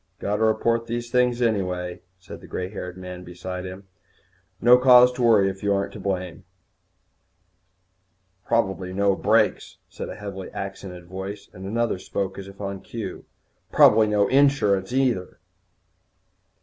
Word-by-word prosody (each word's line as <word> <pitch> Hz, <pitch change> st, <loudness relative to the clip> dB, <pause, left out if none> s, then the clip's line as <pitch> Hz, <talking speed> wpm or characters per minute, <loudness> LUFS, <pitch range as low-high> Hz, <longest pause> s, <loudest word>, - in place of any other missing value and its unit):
"Got 105 Hz, +1 st, -2 dB
to 110 Hz, -, +2 dB
report 115 Hz, +1 st, +1 dB
these 120 Hz, 0 st, -4 dB
things 125 Hz, -1 st, +2 dB
right 110 Hz, -4 st, +2 dB
away," 90 Hz, -1 st, -5 dB, 0.2 s
said 90 Hz, -, -11 dB
the -, -, -13 dB
grey 90 Hz, 0 st, -4 dB
haired 90 Hz, -3 st, -7 dB
man 90 Hz, -1 st, -8 dB
beside 90 Hz, +1 st, -7 dB
him. 95 Hz, +1 st, -10 dB, 0.7 s
"No 125 Hz, +1 st, +6 dB
cause 125 Hz, -1 st, +7 dB
to 125 Hz, -, -5 dB
worry 110 Hz, -5 st, +5 dB
if 95 Hz, 0 st, -4 dB
you 100 Hz, -1 st, +1 dB
ain't 100 Hz, -, -4 dB
to 110 Hz, -, -8 dB
blame." 95 Hz, -3 st, -4 dB, 2.0 s
"Probably 95 Hz, -5 st, -1 dB
no 100 Hz, 0 st, +2 dB
brakes," -, -, +1 dB
said -, -, -7 dB
a -, -, -7 dB
heavily 95 Hz, -2 st, -7 dB
accented 95 Hz, -2 st, -7 dB
voice, 95 Hz, +3 st, -7 dB
and 95 Hz, +1 st, -8 dB
another 115 Hz, -2 st, -1 dB
spoke 95 Hz, 0 st, -4 dB
as 95 Hz, -, -8 dB
if 100 Hz, 0 st, -13 dB
on 100 Hz, -1 st, -5 dB
cue, -, -, -7 dB, 0.5 s
"Probably 110 Hz, 0 st, +6 dB
no 105 Hz, -1 st, +2 dB
insurance, 130 Hz, -8 st, +3 dB
neither." 125 Hz, -8 st, 0 dB
100 Hz, 150 wpm, -24 LUFS, 95-115 Hz, 2.0 s, cause